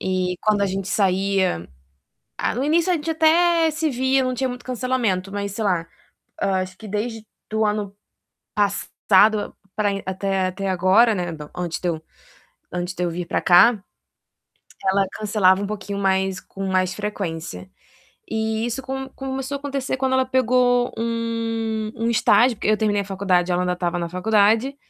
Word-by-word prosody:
E 185 -1 -1
quando 210 -1 +2
a - - +3
gente 195 0 -3
saía 190 - +1 0.7
ah, - - -1
no 260 - -1
início 335 +4 +2
a - - +3
gente 325 +1 -2
até 330 +1 +4
se 315 0 -1
via, 260 +1 +1
não 255 0 -1
tinha 260 +1 -1
muito 245 0 -8
cancelamento, 235 -7 -1
mas, 200 -1 -3
sei 220 - -3
lá, 175 -4 0 0.6
hã, 190 -1 +1
acho 185 0 -8
que 220 - -10
desde 220 +2 -3 0.3
do 220 0 +1
ano 210 -1 -2 0.6
passado 205 +1 +2 0.2
para 205 -1 +1
e 195 - -4
até 190 0 -1
até 195 +1 -4
agora, 190 +5 +4
né, 180 -2 -2 0.3
antes 175 -2 -3
de 180 - -1
eu 160 -2 -2 0.7
antes 180 +1 -3
de 180 - -4
eu 170 - -1
vir 175 +1 -4
para - - -1
cá, 190 +6 +6 1.1
ela 195 +1 +3
cancelava 205 -2 +2
um - - -2
pouquinho 205 -1 -5
mais 190 -1 +1
com 195 0 -7
mais 185 -1 +1
frequência. 165 - -5 0.6
E 220 +1 -1
isso 245 +3 -3
com 265 0 -5
começou 270 +1 -5
a - - -6
acontecer 275 -2 -3
quando 260 0 0
ela 260 0 +2
pegou 250 -1 +2
um 225 -1 -2
um 230 +1 0
estágio. 235 +1 +4
Porque 210 - -3
eu 215 - +4
terminei 205 -2 +1
a - - -8
faculdade 185 -2 +1
ela 180 +1 +1
ainda 180 - 0
estava 175 0 -2
na 170 -1 -3
faculdade. 220 +8 +2
210 Hz, 175 wpm, -22 LUFS, 185-245 Hz, 1.1 s, cá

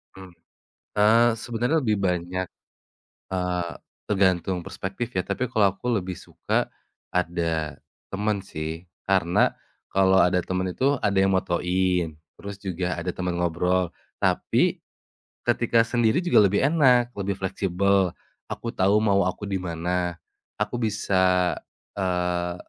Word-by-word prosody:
Mmm, 95 -1 -11 0.7
eee, 115 +3 +5
sebenarnya 120 +6 -1
lebih 110 -4 +1
banyak, 90 0 -1 0.9
eee, 90 -2 -1 0.4
tergantung 95 -2 +1
perspektif 95 +7 -5
ya, 90 - +2
tapi 120 +6 -2
kalau 100 -3 +3
aku 100 - -10
lebih 95 -1 -3
suka - - -2 0.4
ada 85 -4 -1 0.3
temen 105 +1 0
sih. 80 0 -6 0.2
Karena 90 -3 +3 0.4
kalau 95 0 +4
ada 90 +1 +4
temen 95 0 -1
itu 135 +9 +1
ada 100 -1 +1
yang 95 0 +4
motoin, 90 -2 0 0.2
terus 100 0 -7
juga 90 -2 -3
ada 90 +1 -2
temen 90 0 -3
ngobrol. 90 +1 +1 0.3
Tapi, - - +2 0.7
ketika 115 -1 +3
sendiri 120 +6 +1
juga 175 - +5
lebih 100 +2 +1
enak, 130 -5 +4
lebih 100 0 -1
fleksibel, 95 -1 +1 0.3
aku 115 - -5
tahu 100 +2 +3
mau 100 -3 +3
aku 90 +3 -4
di 95 - 0
mana. 90 0 -2 0.5
Aku 105 +3 -1
bisa, 95 -5 +2 0.4
eee, 90 -2 -1
95 Hz, 125 wpm, -25 LUFS, 90-105 Hz, 0.9 s, eee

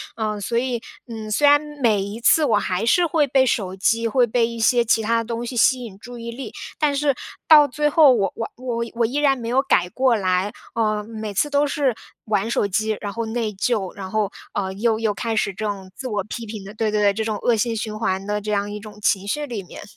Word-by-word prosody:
嗯， 215 -2 -2
所 235 +4 -1
以 240 -1 -1 0.3
嗯， 220 -2 -7
虽 290 +7 +3
然 290 0 +7 0.2
每 215 -4 +3
一 200 +3 -5
次 310 +7 +4
我 220 -6 +3
还 190 0 -1
是 345 +9 +4
会 310 -3 +2
被 265 0 +3
手 195 -6 -1
机， 230 +4 +1
会 245 +2 +3
被 235 0 +1
一 235 -1 -7
些 240 +2 +4
其 225 0 +2
他 230 +2 +2
的 230 - -1
东 235 +1 -4
西 245 +1 -6
吸 250 +2 +3
引 200 -4 -10
注 245 +1 -10
意 235 0 -6
力， 240 -2 -7 0.3
但 295 -2 +2
是 280 -1 +1 0.3
到 300 -2 +8
最 295 +3 0
后 295 -3 +6
我 195 -4 0
我 225 - -4
我 235 -2 -3
我 235 -1 +2
依 250 +5 -4
然 285 -2 +3
没 230 - -6
有 255 +3 +3
改 180 -10 +2
过 255 +3 +2
来。 205 - -3 0.5
呃， 215 -2 0
每 215 -1 -6
次 295 +9 +1
都 285 +1 +2
是 280 -3 +1 0.3
玩 210 0 0
手 220 - +1
机， 215 +2 -1
然 205 - -4
后 230 +3 -3
内 225 -1 -2
疚， 195 -1 -1
然 190 -2 -7
后， 215 -1 0 0.2
呃， 190 -2 -2
又 220 +3 +1
又 220 -2 0
开 225 +2 -3
始 200 -2 0
这 215 +3 -5
种 195 -2 -5
自 260 - -6
我 205 -4 -2
批 230 +3 -6
评 210 -2 -7
的 195 +2 -10
对 215 0 -1
对 210 0 +1
对， 200 -1 +4
这 220 +2 -2
种 215 -2 -2
恶 235 +2 +2
性 230 +2 0
循 215 -1 -4
环 190 -3 -1
的 210 0 -1
这 210 +1 -4
样 205 0 -1
一 210 - -5
种 210 0 -12
情 200 -1 +1
绪 295 +8 -1
里 235 -8 -5
面。 180 - -11
225 Hz, 270 characters per minute, -22 LUFS, 210-245 Hz, 0.5 s, 到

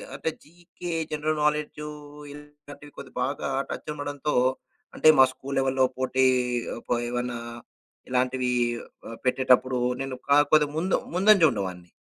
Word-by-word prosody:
అంటే - - -2
GK 175 +2 -9 0.2
general 155 0 -1
knowledge 150 0 -1 0.5
ఇలాంటివి 145 0 -13
కొద్ది 135 - -9
బాగా 135 +3 -2 0.2
టచ్ - - -6
ఉండడంతో, 145 0 -3 0.6
అంటే - - +2
మా 130 - +9
స్కూల్ 135 +1 -7
లెవెల్‌లో 130 0 +2
పోటీ 130 0 +1 0.6
కో - - +1
ఏమన్నా 120 0 -3 0.7
ఇలాంటివి 125 0 0 0.6
ఆహ్, 115 - -8
పెట్టేటప్పుడు 130 0 +3 0.2
నేను 135 -1 -4
కా 140 - +5 0.2
కొద్దిగా 150 -1 +4
ముందు 180 +3 +1 0.2
ముందంజ 195 +2 +5
ఉండేవాడిని. 90 -3 -5
140 Hz, 125 wpm, -26 LUFS, 130-150 Hz, 0.7 s, మా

